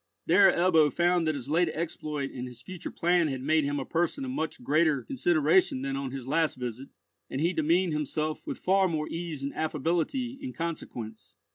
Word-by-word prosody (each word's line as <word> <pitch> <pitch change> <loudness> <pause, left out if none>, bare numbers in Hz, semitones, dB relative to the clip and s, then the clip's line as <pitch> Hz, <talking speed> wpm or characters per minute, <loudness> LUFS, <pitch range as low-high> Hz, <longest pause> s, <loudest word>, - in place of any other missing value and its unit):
There 190 +3 +6
Ebbo 165 -5 +4
found 175 -1 +2
that 155 - +1
his 130 -2 -6
late 165 +3 +2
exploit 155 -3 -4
and 125 0 -6
his 125 -1 -11
future 185 -2 -7
plan 175 -1 +2
had 135 -3 -4
made 155 +1 +2
him 145 0 -1
a 135 - -4
person 175 - -1
of 255 - -4
much 160 - -3
greater 150 0 +2
consideration 170 - +2
than 135 0 -2
on 135 -1 -3
his 130 -1 -6
last 160 +4 +1
visit, 125 +1 -6 0.4
and 135 - -3
he 170 +4 +1
demeaned 170 +2 +2
himself 150 +1 -2
with - - -3
far 190 +1 +3
more 155 -3 -2
ease 165 -4 -5
and 140 - -3
affability 170 - -1
in 265 - -5
consequence. 120 -9 -6
155 Hz, 190 wpm, -28 LUFS, 140-175 Hz, 0.4 s, There